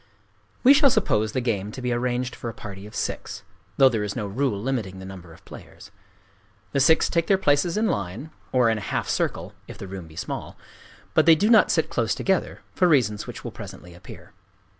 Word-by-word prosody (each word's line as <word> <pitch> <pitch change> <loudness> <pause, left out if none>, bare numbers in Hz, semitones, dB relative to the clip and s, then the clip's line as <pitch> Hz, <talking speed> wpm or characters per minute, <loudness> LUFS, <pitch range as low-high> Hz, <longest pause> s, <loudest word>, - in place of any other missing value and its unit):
We 265 +2 +8
shall 285 -1 +5
suppose 110 - +1
the 130 - 0
game 105 -4 -2
to - - -7
be 125 -1 -2
arranged 125 +1 -2
for 120 - -6
a 115 - -9
party 100 -2 -9
of 105 - -13
six,—though 95 +7 -1
there 110 -4 -1
is 105 -1 -4
no 105 - -3
rule 105 +1 -1
limiting 110 -5 -3
the 95 - -9
number 95 -3 -10
of 80 - -17
players. 100 - -13 0.8
The 140 - 0
six 160 +4 +4
take 170 -1 0
their 195 - +4
places 165 +1 +1
in 220 - +2
line, 100 - -3 0.2
or 125 -2 +3
in 110 - -1
a 100 - -7
half - - -1
circle—if - - -3
the - - -8
room 95 -3 -8
be 80 - -15
small; - - -6 0.6
but - - +3
they 165 - +9
do 205 +8 +2
not 225 - +6
sit - - +1
close - - 0
together, - - -1
for 180 - +3
reasons 120 -10 +2
which - - -8
will - - -5
presently 90 0 -10
appear. 85 - -13
120 Hz, 205 wpm, -24 LUFS, 100-145 Hz, 0.8 s, they